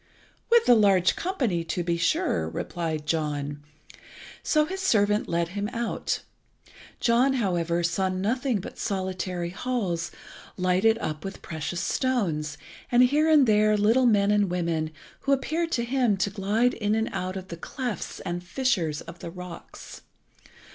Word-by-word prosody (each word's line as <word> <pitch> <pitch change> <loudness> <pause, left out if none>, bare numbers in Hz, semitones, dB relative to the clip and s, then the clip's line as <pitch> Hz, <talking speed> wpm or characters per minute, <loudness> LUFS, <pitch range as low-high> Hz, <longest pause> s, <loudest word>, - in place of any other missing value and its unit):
"With 465 0 +5
the - - +7
large 195 -5 +4
company, 250 - -1
to 175 +1 -2
be 170 0 0
sure," 85 - +1
replied 155 - -3
John. 145 -2 -2 0.8
So 305 -1 +2
his 380 +4 -5
servant 210 - +2
led 170 0 0
him 205 +3 -3
out. 235 -1 -2 0.8
John, 250 +3 +3
however, 175 -7 0
saw 190 +3 +1
nothing 225 +6 0
but - - -9
solitary 185 -2 -2
halls 190 -6 -2 0.5
lighted 185 +5 +3
up 155 -8 -4
with 195 - -7
precious 165 +1 -4
stones, 170 - -1 0.3
and 245 +1 +6
here 295 +5 +3
and 300 -4 +6
there 215 -1 +4
little 230 +5 +4
men 205 -2 +4
and 205 -2 +3
women, 170 -3 -1 0.3
who 275 - +1
appeared 325 +5 -1
to 235 - +1
him 240 -4 +1
to 200 +1 0
glide 210 +5 +1
in 210 0 0
and 220 0 0
out 185 +1 -3
of 190 0 -8
the 170 - -5
clefts 245 +5 -5
and 175 0 -4
fissures 180 - 0
of 170 +1 -11
the - - -6
rocks. 180 0 -10
195 Hz, 150 wpm, -26 LUFS, 170-240 Hz, 0.8 s, the